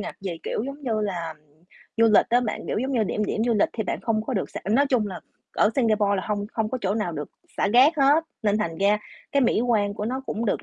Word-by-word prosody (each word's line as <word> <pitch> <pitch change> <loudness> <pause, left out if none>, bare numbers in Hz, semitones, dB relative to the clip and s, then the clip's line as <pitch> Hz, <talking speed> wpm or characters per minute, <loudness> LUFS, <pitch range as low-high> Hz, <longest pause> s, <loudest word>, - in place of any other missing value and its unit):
ngặt - - -5
về, 185 -4 -5
kiểu, - - -2
giống 280 +2 -7
như 225 -4 -1
là, 175 -6 -3 0.6
du 230 - +4
lịch 215 -2 +5
á 245 - +4
bạn. 235 -3 -3
Kiểu - - 0
giống 260 +4 -2
như 230 -4 +2
điểm 210 +2 -1
điểm 220 +2 -1
du 235 -1 +2
lịch 210 - +3
thì 225 - -2
bạn - - -3
không 220 -2 0
có 260 - -3
được 195 - -2
xả - - -6
nói 275 +6 +4
chung 245 -6 +2
là 190 -3 -6 0.3
ở 210 - +3
Singapore 215 -5 +2
là 190 - -2
hông 205 -1 -2
hông 220 -1 -1
có 255 - -2
chỗ 195 +1 0
nào 210 -6 -2
được 150 -2 -6 0.3
xả - - +1
rác 255 +9 +6
hết, 285 +3 +4 0.2
nên 210 -1 +2
thành 165 -6 -2
ra 205 +2 +3 0.3
cái 280 - +3
mỹ 235 - +2
quan 215 -4 +1
của 210 - -4
nó 260 +4 -3
cũng 225 +2 -3
được - - 0
215 Hz, 270 wpm, -24 LUFS, 205-245 Hz, 0.6 s, rác